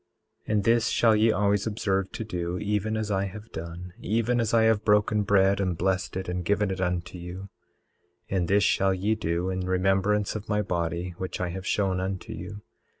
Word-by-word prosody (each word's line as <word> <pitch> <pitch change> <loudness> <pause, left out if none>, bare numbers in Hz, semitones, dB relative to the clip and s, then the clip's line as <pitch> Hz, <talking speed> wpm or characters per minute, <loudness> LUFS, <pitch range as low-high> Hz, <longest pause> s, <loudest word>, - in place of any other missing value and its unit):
18:6 - - -3
And 105 -2 +2
this 115 +1 +3
shall 115 -2 +4
ye 110 +1 +4
always 100 0 +1
observe 95 -3 -1
to 115 - -4
do, 90 -4 -3
even 105 +2 -1
as 110 -1 -2
I 95 0 +1
have 105 +3 -9
done, 85 +2 -7
even 115 +3 0
as 115 -1 0
I 115 -1 +4
have 110 -1 +3
broken 105 0 +3
bread 100 -1 +3
and 90 -4 0
blessed 95 +1 -1
it 95 - -4
and 90 0 -2
given 100 +2 +1
it 95 0 -3
unto 90 0 -2
you. 90 +3 -8 0.8
18:7 95 - +1
And 90 -2 0
this 100 +2 +3
shall 95 0 +2
ye 100 +4 +1
do 90 -3 -1
in 95 - -2
remembrance 95 +3 +1
of 110 -1 -6
my 105 -1 +1
body, 85 -1 -2
which 95 - -4
I 90 -1 -1
have 95 +3 -6
shown 95 -3 +1
unto 95 0 -4
you. 100 +3 -8
95 Hz, 210 wpm, -27 LUFS, 90-105 Hz, 0.8 s, shall